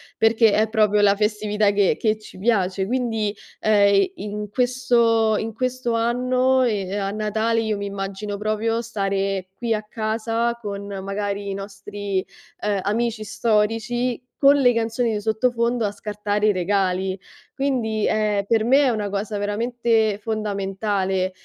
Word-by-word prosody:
perché 225 -1 +4
è 215 +1 +2
proprio 210 -2 +3
la 200 0 +5
festività 210 0 +1
che 200 -2 +2
che 215 -1 +1
ci 215 - -13
piace. 190 -3 +1
Quindi, 225 -3 -1 0.3
ehm, 205 -2 +4
i 200 - +3
in 210 0 -5
questo 235 -3 +2
in 225 +1 -3
questo 255 -1 -1
anno, 255 +3 +2
e 200 -6 0
a 195 -1 -1
Natale, 220 +2 0
io 220 -1 -1
mi 200 0 -4
immagino 200 +1 -4
proprio 215 +2 -1
stare 195 -3 -2
qui 235 +2 -1
a 215 - -1
casa 225 +2 -2
con 200 -2 -5 0.2
magari 200 0 -3
i 195 - -3
nostri, 200 -1 -4 0.4
ehm, 205 -2 -1
amici 225 +2 -1
storici, 230 +4 0 0.2
con 280 +1 +7
le 250 -3 +4
canzoni 230 0 0
di 210 - -2
sottofondo 235 +1 +1
a 200 - -1
scartare 210 0 -2
i - - +5
regali. 190 0 0 0.4
Quindi, 240 -6 0
ehm, 210 -2 +1
per 220 +1 +2
me, 270 +4 +5
è 265 - +3
una 210 -3 -1
cosa 205 +1 -3
veramente 220 0 0
fondamentale, 195 -3 -1
215 Hz, 150 wpm, -22 LUFS, 200-230 Hz, 0.4 s, con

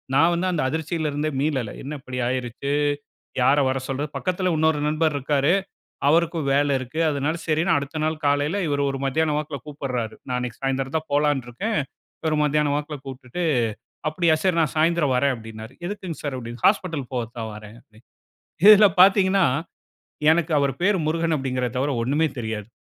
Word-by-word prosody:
நான் 165 +4 +5
வந்து 180 +2 0
அந்த 170 - 0
அதிர்ச்சியில 160 +1 -2
இருந்தே 150 +2 -1
மீளல. 135 -7 -1
என்ன 145 +2 -5
இப்படி 130 -1 -7
ஆகிருச்சு? 125 +2 -3 0.7
யார 140 +3 +4
வர 135 - -1
சொல்றது? 140 +2 -2
பக்கத்தில 185 0 -1
உன்னொரு 160 -1 +2
நண்பர் 155 0 +1
இருக்கிறாரு. 145 +4 +2 0.5
அவருக்கும் 165 -1 +2
வேலை 145 0 +2
இருக்கு. 130 +5 -5
அதனால 145 +2 -1
சரின்னு 160 +3 +2
அடுத்த 140 +2 -4
நாள் 155 0 -2
காலையில 145 +6 +1
இவரு 140 0 0
ஒரு 135 - -4
மத்தியானம் 150 +2 +1
வாக்குல 150 -1 -4
கூப்பிடுறாரு. 130 -6 -4
நான் 125 - -2
அன்னைக்கு 125 -2 -5
சாயந்திரம் 135 +1 -1
தான் 160 0 -4
போலான்டுருக்கேன். 145 - 0 0.4
இவரு 160 -1 +1
மதியானம் 150 -1 +1
வாக்குல 150 0 -4
கூப்பிட்டுட்டு, 130 +5 -6 0.7
"அப்படியா 165 0 +2
சரி 185 -3 +2
நான் 155 -4 0
சாயந்திரம் 155 -4 +2
வரேன்" 140 +1 +2
அப்பிடீன்னாரு. 110 0 -9
"எதுக்குங்க 185 -4 -5
சார்?" 145 -3 -3
அப்பிடீன்னா, 120 -1 -8
"ஹாஸ்பிட்டல் 165 - -1
போகத்தான் 115 -2 -4
வரேன்." 105 +1 -11
அப்பிடி 110 0 -22 0.7
இதில 210 -1 +9
பார்த்தீங்கன்னா, 195 -1 +5 0.9
எனக்கு 165 0 +2
அவரு 140 -1 +1
பேரு 205 +1 +3
முருகன் 165 0 +1
அப்பிடீங்கிறத 130 -3 -2
தவிர 140 +3 0
ஒண்ணுமே 150 +5 +1
தெரியாது. 110 -2 -4
145 Hz, 160 wpm, -23 LUFS, 130-160 Hz, 0.9 s, இதில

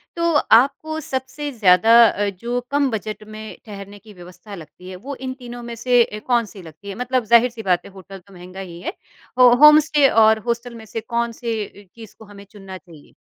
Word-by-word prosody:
तो 335 0 0 0.2
आपको 280 +7 +2
सबसे 270 0 -6
ज़्यादा 205 -3 +3
अ, 205 -1 0
जो 235 +6 -4
कम 285 -1 +1
बजट 215 -1 -6
में 215 0 -10
ठहरने 205 -1 -11
की 215 0 -17
व्यवस्था 180 +3 -13
लगती 180 +2 -13
है, 185 - -8
वो 265 +10 -8
इन 260 0 -6
तीनों 245 -1 -9
में 235 0 -8
से 245 +1 +2
अ, 210 -2 -8
कौन 240 -2 +1
सी 200 -2 -13
लगती 165 +5 -13
है? 195 - -7
मतलब 250 +1 -2
ज़ाहिर-सी 235 +1 +2
बात 180 -3 0
है - - -13
होटल 195 0 -13
तो 195 +2 -21
महँगा 180 +1 -12
ही 175 -3 -9
है। 340 - -5 0.4
हो 250 -1 +7
होम 300 0 +9
स्टे 290 -2 +4
और 220 0 +4
हॉस्टल 235 0 -3
में 225 -1 -12
से 225 +1 -6
कौन 235 +1 -3
से 225 -3 -3
अ, 200 -1 -17
चीज़ 225 -3 -14
को 220 - -13
हमें 200 -1 -14
चुनना 195 -3 -11
चाहिए? 165 -5 -19
220 Hz, 215 wpm, -20 LUFS, 195-245 Hz, 0.4 s, होम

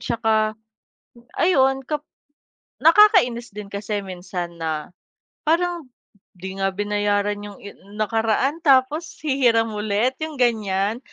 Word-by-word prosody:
'Tsaka, 220 -2 0 0.9
ayon 270 -6 +3
kap 300 -1 -3 0.8
nakakainis 325 - +5
din 210 -1 -7
kasi 205 +1 -3
minsan 180 -1 -6
na, 155 -1 -3 0.6
parang 340 -3 0 0.5
"'Di 190 +2 -7
nga 195 - +1
binayaran 205 0 -1
yung 200 - -12
i 205 - -8 0.3
nakaraan, 225 +7 0
tapos 285 +4 +2
hihiram 240 -6 +2
ulit." 210 +5 0
yung 315 -1 -5
ganyan. 215 -2 +1
225 Hz, 110 wpm, -22 LUFS, 205-270 Hz, 0.9 s, nakakainis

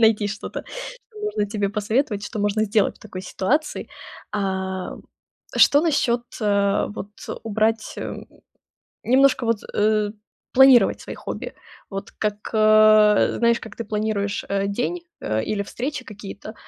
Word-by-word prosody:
найти 220 -2 +4
что-то, 210 +1 -6 0.5
что 430 - -14
можно 420 - -1
тебе 205 -1 -1
посоветовать, 210 +1 -1
что 220 - -6
можно 205 +1 +1
сделать 210 -1 +1
в - - -26
такой 190 -3 -8
ситуации. 285 +13 -1 0.4
А, 190 -2 -2 0.6
что 285 - +6
насчёт, 255 -7 +1 0.2
э, 200 -2 +2
вот, 205 - -7 0.3
убрать, 220 0 0
эм, - - -6 0.8
немножко, 265 0 +4
вот, 230 -2 +1
э, 210 0 +2 0.4
планировать 265 -1 +6
свои - - -7
хобби? - - -6 0.4
Вот, 195 -1 -6
как, 210 -1 -2 0.2
э, 215 -1 +5
знаешь, 235 0 +3
как 220 - -10
ты 230 - -4
планируешь, 210 -1 -2
э, 200 0 0
день, 245 - -2 0.2
э, 110 0 -1
или 200 -1 -1
встречи 255 +5 -5
какие-то. 205 0 -9
215 Hz, 135 wpm, -23 LUFS, 200-235 Hz, 0.8 s, что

